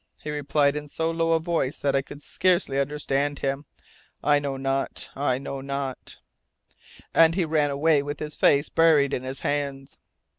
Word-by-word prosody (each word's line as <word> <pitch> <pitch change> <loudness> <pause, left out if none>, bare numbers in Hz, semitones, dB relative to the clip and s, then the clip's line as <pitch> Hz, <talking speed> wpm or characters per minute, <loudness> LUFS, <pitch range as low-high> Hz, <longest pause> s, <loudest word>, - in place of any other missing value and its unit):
He 150 - -6
replied 145 0 +1
in 150 0 -5
so 160 +2 -1
low 165 0 +1
a 165 - +3
voice 160 -5 -1
that 140 -1 0
I 135 - +3
could 145 +1 -12
scarcely 175 -7 +1
understand 145 0 -1
him, 135 +2 -2 0.6
"I 145 -1 +4
know 140 -2 -3
not 135 0 -2
I 135 -3 0
know 135 0 -6
not 140 -1 -5 0.5
" - - -25 0.2
and 165 0 +5
he 180 -3 +1
ran 155 -2 +1
away 145 +1 +3
with 145 +1 -5
his 150 0 -5
face 145 +1 +3
buried 160 -4 +4
in - - -1
his 130 +1 -5
hands.'" 140 -2 -3
145 Hz, 180 wpm, -25 LUFS, 135-155 Hz, 0.6 s, and